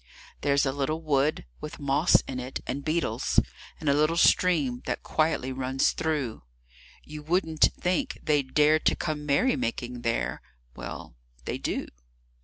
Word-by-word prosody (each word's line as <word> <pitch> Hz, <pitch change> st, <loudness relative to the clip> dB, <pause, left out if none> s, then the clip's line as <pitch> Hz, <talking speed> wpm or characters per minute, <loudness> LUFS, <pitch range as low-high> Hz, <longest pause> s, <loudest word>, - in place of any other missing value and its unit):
There's 140 Hz, 0 st, +2 dB
a 135 Hz, -, +1 dB
little 145 Hz, +4 st, -2 dB
wood, 145 Hz, -, +1 dB
with 150 Hz, -, -7 dB
moss 145 Hz, +4 st, +3 dB
in 130 Hz, -1 st, -6 dB
it 125 Hz, +1 st, -5 dB
and 140 Hz, +2 st, -4 dB
beetles, 165 Hz, +3 st, +1 dB, 0.4 s
And 155 Hz, -, -6 dB
a 140 Hz, -, +5 dB
little 155 Hz, +3 st, +2 dB
stream 150 Hz, -9 st, +3 dB
that -, -, -2 dB
quietly 155 Hz, -4 st, 0 dB
runs 130 Hz, +1 st, +1 dB
through; 150 Hz, -8 st, -2 dB, 0.6 s
You 150 Hz, 0 st, -9 dB
wouldn't 160 Hz, 0 st, +2 dB
think 260 Hz, +11 st, -1 dB
they'd 145 Hz, -4 st, +1 dB
dare 150 Hz, +1 st, +5 dB
to -, -, +2 dB
come 150 Hz, -1 st, -3 dB
merrymaking 125 Hz, -, 0 dB
there 115 Hz, -1 st, -1 dB, 0.3 s
Well, -, -, -8 dB, 0.3 s
they -, -, -3 dB
do. -, -, -2 dB
150 Hz, 145 wpm, -27 LUFS, 135-155 Hz, 0.6 s, a